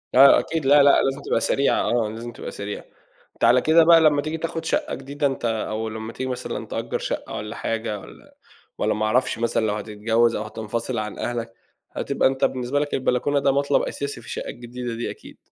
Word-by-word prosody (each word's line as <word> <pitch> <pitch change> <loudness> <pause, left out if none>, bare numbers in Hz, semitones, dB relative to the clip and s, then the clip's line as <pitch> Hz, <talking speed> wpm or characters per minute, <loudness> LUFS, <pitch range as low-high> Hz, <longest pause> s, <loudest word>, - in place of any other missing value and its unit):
آه 135 +2 +8
أكيد، 160 -3 -3
لا، 145 +1 +7
لأ، 140 - +6
لازم 135 +1 -1
تبقى 115 - 0
سريعة، 140 +4 +2
آه 115 -3 +1
لازم 115 +2 -7
تبقى - - -8
سريعة، 100 0 -6 0.5
أنت - - -9
على 125 +1 +6
كده 165 +1 +5
بقى 165 0 +7
لمّا 150 -2 +4
تيجي 155 +2 -3
تاخد 165 0 -4
شقّة - - -1
جديدة 140 +2 -2
أنت 135 -3 -4
أو 110 -1 -2
لمّا 110 +1 -6
تيجي 130 0 -4
مثلًا 125 - -4
تأجّر - - -3
شقّة - - -4
والَّا 105 +2 -5
حاجة، 110 -2 -3
والَّا - - -15 0.4
والَّا - - +1
ما 110 +1 -1
اعرفش، 125 +2 +1
مثلًا 115 -1 +1
لو 105 - 0
هتتجوّز 115 +2 +1
أو 105 - -2
هتنفصل 110 +2 -4
عن 105 -1 -4
أهلك، 120 -1 -3 0.4
هتبقى - - +1
أنت 135 0 +1
بالنسبة 130 +2 -1
لك 145 0 -3
البلكونة 130 +2 +1
ده 140 0 +3
مطلب 140 +1 +2
أساسي 140 -3 -4
في 120 - -15
الشقّة - - -5
الجديدة 120 0 -6
دي 115 - -3
أكيد. - - -13
120 Hz, 205 wpm, -23 LUFS, 110-140 Hz, 0.5 s, آه